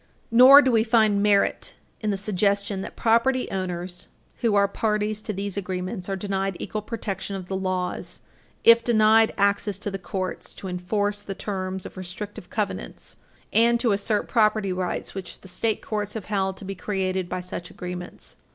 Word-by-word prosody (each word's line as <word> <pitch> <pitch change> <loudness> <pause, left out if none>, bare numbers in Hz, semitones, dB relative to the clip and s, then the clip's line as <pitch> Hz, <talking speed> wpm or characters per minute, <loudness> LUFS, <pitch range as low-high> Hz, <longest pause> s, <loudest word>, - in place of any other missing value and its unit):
Nor 260 +5 +9
do 260 - +2
we 225 -2 +4
find 220 -3 +3
merit 205 -1 +2 0.2
in 215 - -2
the 200 - 0
suggestion 200 0 0
that - - -7
property 240 +3 +2
owners 180 -1 -4 0.3
who 225 -3 +1
are 200 0 +5
parties 210 +1 -1
to 215 - -4
these 200 0 -4
agreements 185 0 -4
are 195 - 0
denied 195 -1 -2
equal 215 - -4
protection 200 -3 -4
of 185 -2 -6
the 190 - -3
laws 185 -1 -3 0.4
if 230 0 +7
denied 220 -1 +5
access 200 0 +1
to 205 0 -5
the 195 - -4
courts 185 0 -4
to 190 - -8
enforce 205 +3 -1
the 195 -1 -6
terms 190 -2 -4
of - - -9
restrictive 185 +1 -7
covenants 210 -2 -4 0.4
and 235 +1 +4
to 235 -2 +2
assert 205 +1 0
property 215 -4 +2
rights 180 -1 -3
which 190 -2 -7
the - - -13
state 215 +4 -1
courts 210 -1 -3
have 220 - -5
held 190 -2 -1
to - - -8
be 195 - -4
created 190 -1 -2
by 185 - -2
such 180 -1 -6
agreements. 180 0 -8
200 Hz, 175 wpm, -25 LUFS, 185-215 Hz, 0.4 s, Nor